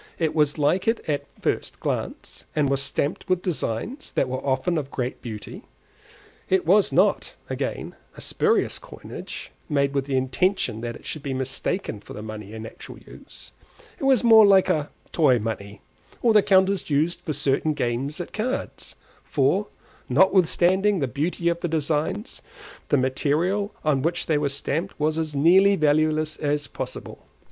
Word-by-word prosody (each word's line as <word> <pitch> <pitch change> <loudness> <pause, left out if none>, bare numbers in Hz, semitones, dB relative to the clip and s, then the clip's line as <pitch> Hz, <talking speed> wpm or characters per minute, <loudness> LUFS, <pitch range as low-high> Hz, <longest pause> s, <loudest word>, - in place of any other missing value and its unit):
It 160 -2 0
was 150 -1 +2
like 155 +7 +1
it 225 +1 +2
at 145 -2 -1
a - - -23
first - - -2
glance, - - -4
and 150 -3 +2
was 135 0 +1
stamped 140 +5 -2
with 185 -1 +1
designs 180 - -3
that 135 - +1
were 130 0 -4
often 140 +6 0
of 140 -2 -6
great 125 -1 -4
beauty; 110 -4 -7 0.9
it 190 -2 +2
was 195 +4 +4
not, - - +2 0.2
again, - - -4 0.2
a - - -9
spurious 440 +1 +1
coinage, - - -9 0.2
made 140 -2 +1
with 140 -1 0
the 135 -2 0
intention 130 - 0
that 120 0 -4
it - - -14
should 155 - -4
be 135 -1 -3
mistaken 130 - -2
for - - -12
the 105 - -7
money 105 -2 -8
in 110 0 -7
actual - - -10
use; - - -14 0.5
it - - -7
was 265 -4 +4
more 225 -2 +8
like 195 -2 +5
a 155 -5 0 0.2
toy 145 -7 +4
money, 105 -2 -5 0.4
or 230 -2 +5
the 210 - +7
counters 190 -1 +3
used 160 +4 +1
for 160 - -4
certain 145 +3 +1
games 130 +6 -2
at 175 - -6
cards; 250 +5 -4 0.3
for, - - +1 0.4
notwithstanding 190 +2 +3
the 140 -6 0
beauty 160 +7 -2
of 170 0 +1
the 175 - -2
designs, 160 - -2 0.5
the 145 - +4
material 155 +10 0
on 145 -3 +2
which 170 +4 0
they 155 -2 +1
were 145 -1 0
stamped 140 +4 -3
was 155 +1 +1
as 155 -2 -3
nearly 190 +7 +5
valueless 155 -1 +2
as 145 -1 -1
possible. - - -7
155 Hz, 170 wpm, -24 LUFS, 135-185 Hz, 0.9 s, more